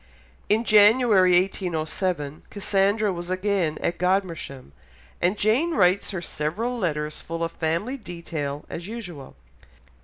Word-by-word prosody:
In 220 +2 +3
January 210 -3 +5
1807, 170 -4 -2
Cassandra 200 +1 +1
was 175 0 -6
again 185 -4 0
at 170 - -1
Godmersham, 175 - -1 0.5
and 180 +4 +2
Jane 265 +12 +2
writes 185 -3 +3
her 185 -4 -4
several 180 +13 -2
letters 150 -8 -2
full 165 0 -4
of 165 - -2
family 170 +12 -2
detail 165 - -5
as 170 +2 -7
usual. 180 - -8
185 Hz, 120 wpm, -24 LUFS, 165-210 Hz, 0.5 s, January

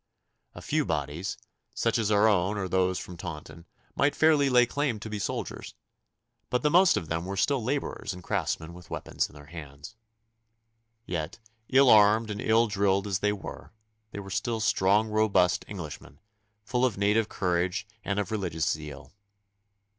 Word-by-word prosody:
A - - -10
few - - +1
bodies, 85 +7 -3 0.4
such - - +1
as 110 -2 0
our 105 +1 +4
own 100 0 +2
or 95 -2 -2
those 95 0 +1
from 90 - -8
Taunton, 85 0 -8 0.3
might 140 +1 +2
fairly 150 -3 +4
lay 125 -1 +5
claim 135 -3 -1
to 110 +1 -8
be 105 - -3
soldiers, - - -5 0.7
but 125 0 0
the 150 - +3
most 180 +1 +5
of 80 - -4
them 80 +1 -2
were 95 +2 -5
still 135 +4 +1
labourers 140 +4 -2
and 90 -1 -9
craftsmen 85 -4 -2
with 90 0 -13
weapons - - -2
in - - -18
their 75 0 -12
hands. 75 +3 -10 1.1
Yet, 80 -3 -4 0.3
ill 135 -1 +6
armed 110 +1 +5
and 105 - -4
ill 115 +1 +4
drilled 100 -2 +1
as 95 -3 -1
they 105 0 +1
were, 105 +1 -8 0.4
they 100 - -7
were 95 -1 -8
still 110 +3 -1
strong 105 0 +3
robust 105 -5 +2
Englishmen, 75 -7 -8 0.4
full 125 +3 -1
of 125 -6 +1
native 105 +2 +2
courage 90 +1 -1 0.2
and 100 - -2
of 105 -1 -2
religious 90 -7 -1
zeal. 75 -1 -5
100 Hz, 170 wpm, -28 LUFS, 90-110 Hz, 1.1 s, ill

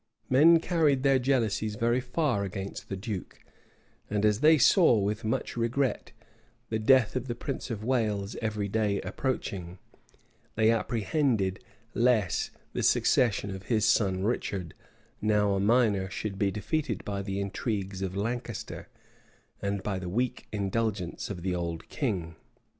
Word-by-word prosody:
Men 160 +6 +7
carried 155 -6 +2
their 135 -1 +4
jealousies 115 -5 0
very 120 +3 +1
far 125 -4 0
against 100 0 -6
the 95 - -3
duke; 100 -1 -6 0.7
and 105 0 0
as 105 -1 +3
they 155 +3 +6
saw, 165 - +5
with 105 +1 -1
much 110 - -2
regret, 120 +3 -1 0.6
the 110 - 0
death 130 +1 +4
of 130 0 -2
the 120 - -3
prince 135 +3 -5
of 110 -3 -4
Wales 110 -5 0
every 105 -2 -1
day 105 -1 0
approaching, 95 -4 -3 0.8
they 110 +1 +4
apprehended 115 - 0 0.3
lest 115 -5 +2 0.2
the - - -2
succession 100 -5 +2
of 95 0 -8
his 110 -3 +2
son 95 -4 +2
Richard, 100 -6 -2 0.5
now 105 -1 +2
a 100 - 0
minor, 105 -3 +2
should 100 0 -5
be 100 - +2
defeated 105 +10 -2
by 100 -1 -3
the 100 0 -3
intrigues 100 -1 -3
of 95 0 -3
Lancaster, 115 +1 -4 0.7
and 100 -1 -2
by 100 -3 -2
the 90 -1 -5
weak 120 +6 -2
indulgence 100 -2 -2
of 90 -4 -6
the 95 -1 0
old 85 -2 -4
king. 90 - -2
105 Hz, 145 wpm, -28 LUFS, 100-120 Hz, 0.8 s, Men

